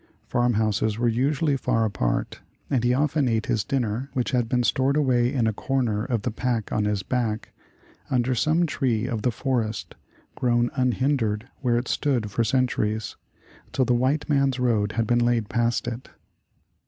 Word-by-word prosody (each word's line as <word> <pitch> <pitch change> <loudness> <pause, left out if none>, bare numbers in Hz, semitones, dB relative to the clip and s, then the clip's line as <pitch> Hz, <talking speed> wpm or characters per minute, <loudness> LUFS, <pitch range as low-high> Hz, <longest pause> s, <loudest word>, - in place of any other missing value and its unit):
Farm 120 0 +1
houses 110 0 0
were 120 +1 +1
usually 140 +5 +1
far 120 -4 +1
apart, 80 - -1 0.3
and 130 -4 +1
he 120 - +3
often 145 +1 +1
ate 110 -2 0
his 110 - 0
dinner, 125 +1 -2
which 125 0 -1
had 120 -3 0
been 125 -1 +1
stored 135 +4 +2
away 125 -4 +2
in 130 -5 +1
a 110 - +1
corner 115 -3 -1
of 120 -5 -2
the 125 - -1
pack 115 -1 -2
on 105 - 0
his 105 -2 -1
back, 115 -2 -2 0.6
under 125 0 +1
some 155 +8 +2
tree 130 -7 0
of 120 -4 -2
the 125 - +1
forest, 115 -3 -2 0.4
grown 120 -1 +1
unhindered 125 -3 0
where 120 -3 +1
it 120 +1 -2
stood 120 -8 0
for 115 +4 +1
centuries, 110 -3 0 0.6
till 130 -1 +2
the 125 - +2
white 130 +5 +1
man's 140 -3 +2
road 110 -5 +1
had 115 0 0
been 120 +2 +2
laid 120 -3 +1
past 120 -1 0
it. 120 +1 -5
120 Hz, 175 wpm, -25 LUFS, 110-130 Hz, 0.6 s, he